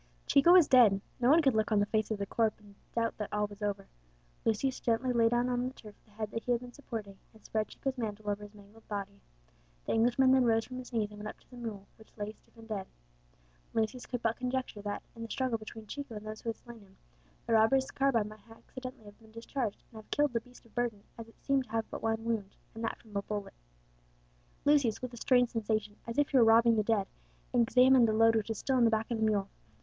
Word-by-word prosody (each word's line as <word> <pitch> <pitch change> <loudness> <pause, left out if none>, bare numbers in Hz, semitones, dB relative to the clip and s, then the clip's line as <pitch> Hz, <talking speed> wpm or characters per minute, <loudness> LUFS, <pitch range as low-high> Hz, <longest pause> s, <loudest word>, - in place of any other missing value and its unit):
Chico 280 +5 +5
was 360 -4 +8
dead, 230 -7 +6 0.2
no 245 0 +3
one 320 +3 +6
could 270 -3 +4
look 220 0 +1
on 210 - +4
the 205 - +3
face 215 0 0
of 215 - -1
the 200 - -2
corpse 220 +2 0
and 205 -1 -17 0.2
doubt 230 -1 0
that 210 - -4
all 210 0 +1
was 205 0 -11
over. 200 -1 -2 0.6
Lucius 255 +4 +1
gently 240 +2 +1
laid 230 -1 +4
down 240 +1 +1
on 250 0 0
the 260 - -6
turf 210 -2 -12
the - - -26
head 215 0 -4
that 230 - -3
he 245 - -2
had 240 -1 +2
been 245 -1 -10
supporting, 220 -8 -7 0.2
and 220 - -20
spread 215 -1 -1
Chico's 270 -1 -4
mantle 215 -2 -4
over 205 0 -1
his 205 0 -11
mangled 210 +2 -17
body. 200 -1 -5 0.6
The - - -2
Englishman 245 +3 +4
then 260 -1 +5
rose 225 -1 +3
from 255 0 -7
his 255 - -9
knees, 215 -3 -1
and 210 - -11
went 210 - -6
up - - -11
to - - -28
the - - -11
mule, 220 -5 -6
which 220 - -20
lay 205 0 -3
stiff 220 - -26
and 225 0 -13
dead. 205 -4 -4 0.9
Lucius 225 +3 -1
could 245 -2 -4
but 225 0 +1
conjecture 255 -4 -3
that, 205 0 -4
in 230 - -10
the 230 - -6
struggle 255 -3 -1
between 220 0 -9
Chico 280 +1 -7
and 210 0 -7
those 215 0 -7
who 230 - -3
had 225 - -3
slain 235 -2 -12
him, 195 -1 -20 0.5
the - - 0
robber's 260 +5 +4
carbine 240 -6 +1
might 215 0 -12
accidentally 255 +1 -10
have 205 0 -14
been 220 -1 -18
discharged 230 0 -4
and 225 - -12
have - - -26
killed 295 -3 +1
the 230 - 0
beast 250 +1 -18
of 230 - -22
burden, 235 -4 -2 0.2
as 225 - -7
it 225 - -20
seemed 275 -2 +2
to 215 - -19
have 225 -1 0
but - - -5
one 225 0 -1
wound, 220 -4 -2 0.2
and 225 - -7
that - - -2
from 215 -3 -17
a 200 - +1
bullet. 205 0 -5 1.1
Lucius, 280 -7 +3
with 255 -1 -6
a - - -8
strange 245 0 +3
sensation, 215 -2 -1
as 230 - -5
if 290 -1 +3
he 275 - +3
were 245 - +7
robbing 230 +1 +6
the 215 - +3
dead, 210 -2 +1 0.5
examined 250 +1 +5
the 220 - +1
load 225 +1 +5
which 220 -1 0
was 225 - -2
still 265 +3 0
on 245 - +4
the - - +5
back 220 +1 -1
of 230 - -1
the - - +1
mule. 205 -3 +2
225 Hz, 255 wpm, -31 LUFS, 215-245 Hz, 1.1 s, was